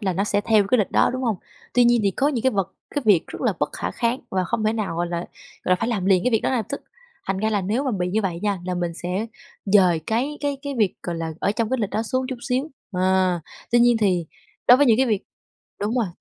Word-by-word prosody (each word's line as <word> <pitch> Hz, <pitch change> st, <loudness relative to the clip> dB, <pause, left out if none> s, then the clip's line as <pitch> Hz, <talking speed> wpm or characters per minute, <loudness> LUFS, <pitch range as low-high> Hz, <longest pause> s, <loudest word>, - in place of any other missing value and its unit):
là 190 Hz, -4 st, 0 dB
nó 195 Hz, +4 st, 0 dB
sẽ 205 Hz, -1 st, +1 dB
theo 215 Hz, -1 st, +3 dB
cái 250 Hz, -, +3 dB
lịch 205 Hz, -, +1 dB
đó, -, -, +3 dB
đúng 260 Hz, -, -3 dB
hông? 225 Hz, -5 st, 0 dB, 0.4 s
Tuy 245 Hz, -1 st, +5 dB
nhiên 240 Hz, 0 st, +4 dB
thì 200 Hz, -, +3 dB
có 275 Hz, +9 st, +1 dB
những 250 Hz, -6 st, -1 dB
cái 260 Hz, -, +3 dB
vật 195 Hz, -1 st, -1 dB, 0.2 s
cái 290 Hz, -, 0 dB
việc 190 Hz, -6 st, +4 dB
rất -, -, -8 dB
là -, -, +2 dB
bất -, -, +1 dB
khả -, -, -3 dB
kháng 235 Hz, +2 st, -1 dB
và 185 Hz, -1 st, 0 dB
không 225 Hz, +2 st, -2 dB
thể 215 Hz, -, +2 dB
nào, 215 Hz, -7 st, -3 dB
gọi 175 Hz, 0 st, 0 dB
là, 170 Hz, 0 st, -3 dB, 0.5 s
gọi -, -, -1 dB
là, -, -, +7 dB
phải 230 Hz, -, -2 dB
làm 210 Hz, -6 st, -1 dB
liền 185 Hz, -2 st, +4 dB
cái 250 Hz, -, +3 dB
việc 225 Hz, -, +2 dB
đó -, -, 0 dB
ngay 255 Hz, -, +1 dB
lập 220 Hz, -, -3 dB
tức, 280 Hz, -, -4 dB, 0.5 s
thành 195 Hz, -, 0 dB
ra 220 Hz, +2 st, 0 dB
là 205 Hz, -2 st, +1 dB
nếu 225 Hz, +9 st, -1 dB
mà 265 Hz, -, 0 dB
bị 180 Hz, -5 st, -1 dB
như 215 Hz, +4 st, 0 dB
vậy 175 Hz, -4 st, -2 dB
nha, 200 Hz, -3 st, 0 dB
là 180 Hz, 0 st, -2 dB
mình 175 Hz, -1 st, -2 dB
sẽ 185 Hz, +6 st, -3 dB, 0.4 s
dời 190 Hz, -5 st, +4 dB
cái 265 Hz, +7 st, -1 dB
cái 285 Hz, -2 st, -1 dB
cái 285 Hz, -1 st, -4 dB
việc, 205 Hz, -4 st, +2 dB
gọi 170 Hz, -1 st, -3 dB
là, 165 Hz, -1 st, -3 dB
ở 200 Hz, -, +1 dB
trong 230 Hz, 0 st, -1 dB
cái 260 Hz, -, +2 dB
lịch 205 Hz, -, -1 dB
đó 220 Hz, -, -1 dB
xuống 255 Hz, +3 st, -1 dB
chút 260 Hz, -, -3 dB
xíu, 265 Hz, +5 st, 0 dB, 0.2 s
à. 185 Hz, -1 st, +2 dB, 0.3 s
Tuy 240 Hz, -, +6 dB
nhiên 240 Hz, 0 st, +5 dB
thì 180 Hz, -5 st, +2 dB, 0.4 s
đối 245 Hz, -, +10 dB
với 285 Hz, -, +4 dB
những 225 Hz, -3 st, +5 dB
cái 260 Hz, +2 st, +3 dB
việc 210 Hz, -4 st, 0 dB, 0.6 s
đúng 210 Hz, +4 st, -1 dB
rồi, 230 Hz, -5 st, +2 dB
215 Hz, 290 wpm, -23 LUFS, 185-245 Hz, 0.6 s, đối